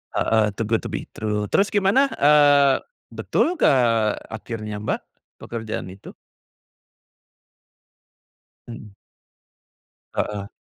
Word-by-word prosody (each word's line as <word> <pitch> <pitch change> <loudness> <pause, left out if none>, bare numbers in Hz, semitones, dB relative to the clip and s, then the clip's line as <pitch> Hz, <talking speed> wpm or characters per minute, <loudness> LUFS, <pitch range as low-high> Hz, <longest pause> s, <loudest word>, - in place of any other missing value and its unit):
Heeh, 105 -2 +1
too 115 - -2
good 110 +1 0
to - - -5
be - - -4
true 105 -1 -3
terus 200 - +3
gimana, 205 +8 +2
eee, 145 -2 +5 0.3
betul 350 +2 -1
gak 115 -5 +3 0.2
akhirnya 110 -1 -6
Mbak, 105 - -2 0.4
pekerjaan 110 -4 -6
itu? 95 - -13 2.5
Mhm. 110 -3 -10 1.2
Heeh. 100 -1 -3
115 Hz, 95 wpm, -22 LUFS, 105-145 Hz, 2.5 s, eee